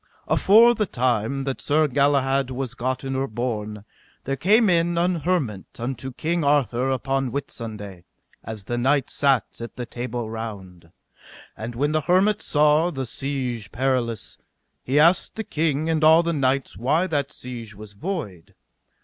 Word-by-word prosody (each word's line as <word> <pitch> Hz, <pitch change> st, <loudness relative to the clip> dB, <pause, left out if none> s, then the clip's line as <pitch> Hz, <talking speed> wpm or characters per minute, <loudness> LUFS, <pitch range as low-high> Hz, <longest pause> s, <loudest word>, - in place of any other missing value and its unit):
Afore 230 Hz, +4 st, +6 dB
the 215 Hz, -4 st, -1 dB
time 125 Hz, -, 0 dB
that 135 Hz, -1 st, -4 dB
Sir 155 Hz, +1 st, +2 dB
Galahad 140 Hz, -1 st, +2 dB
was 130 Hz, -1 st, -4 dB
gotten 130 Hz, +2 st, -3 dB
or 135 Hz, +1 st, -1 dB
born, 105 Hz, -3 st, -4 dB, 0.4 s
there 135 Hz, -, -2 dB
came 210 Hz, -, +4 dB
in 170 Hz, -1 st, +2 dB
an 175 Hz, +1 st, +2 dB
hermit 145 Hz, -, -1 dB
unto 130 Hz, +2 st, -4 dB
King 165 Hz, +6 st, -1 dB
Arthur 135 Hz, -3 st, +2 dB
upon 135 Hz, 0 st, -1 dB
Whitsunday, 105 Hz, -8 st, -6 dB, 0.4 s
as 110 Hz, -3 st, -7 dB
the 120 Hz, +4 st, -3 dB
knights 135 Hz, +1 st, +1 dB
sat 135 Hz, -4 st, +3 dB, 0.2 s
at 115 Hz, -, -7 dB
the 125 Hz, -, -5 dB
Table 120 Hz, 0 st, -5 dB
Round. 100 Hz, -7 st, -8 dB, 0.6 s
And 115 Hz, +2 st, -6 dB
when 145 Hz, +5 st, 0 dB
the 155 Hz, 0 st, +1 dB
hermit 185 Hz, +6 st, +2 dB
saw 150 Hz, +3 st, +3 dB
the 135 Hz, -6 st, -4 dB
Siege 125 Hz, -4 st, -4 dB
Perilous, 120 Hz, -4 st, -2 dB, 0.4 s
he 135 Hz, +3 st, 0 dB
asked 170 Hz, +4 st, +3 dB
the 220 Hz, -, -3 dB
king 155 Hz, -4 st, -1 dB
and 160 Hz, -1 st, 0 dB
all 160 Hz, +2 st, +7 dB
the 170 Hz, 0 st, 0 dB
knights 135 Hz, -2 st, 0 dB
why 140 Hz, -, +1 dB
that 145 Hz, -6 st, -1 dB
siege 115 Hz, -4 st, -8 dB
was 105 Hz, 0 st, -11 dB
void. 105 Hz, -, -6 dB
135 Hz, 155 wpm, -23 LUFS, 115-155 Hz, 0.6 s, all